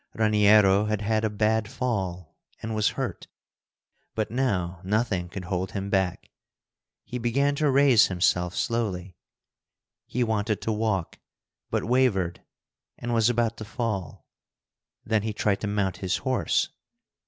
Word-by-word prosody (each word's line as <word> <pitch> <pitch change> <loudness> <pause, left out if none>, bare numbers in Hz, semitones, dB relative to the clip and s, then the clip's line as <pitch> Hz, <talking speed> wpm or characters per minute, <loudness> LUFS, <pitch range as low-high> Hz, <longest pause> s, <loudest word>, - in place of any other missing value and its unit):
Raniero 105 -2 +5
had 105 -1 -1
had 110 +1 0
a 110 - +2
bad 110 +1 +1
fall, 95 - -3 0.2
and 110 0 -4
was 110 -1 +2
hurt. - - -4 0.9
But 110 -1 -2
now 95 -9 -1
nothing 95 -3 0
could 95 0 -7
hold 90 +1 -3
him 100 0 -4
back. 95 -3 -1 0.7
He 125 - -5
began 135 +5 +1
to 150 -1 +2
raise 135 -4 +5
himself 90 -1 +1
slowly. 100 -6 -2 0.9
He 125 - 0
wanted 110 -2 0
to 110 - 0
walk, 105 -5 -1 0.5
but - - -1
wavered, 105 -8 +1 0.6
and 120 0 -3
was 115 0 +4
about 115 -1 0
to 110 - -6
fall. 105 -6 -4 0.8
Then 110 -1 +1
he 110 +1 -3
tried 100 -1 0
to 105 - -2
mount 100 -2 -1
his 95 0 -1
horse. 130 +8 0
105 Hz, 140 wpm, -26 LUFS, 95-115 Hz, 0.9 s, Raniero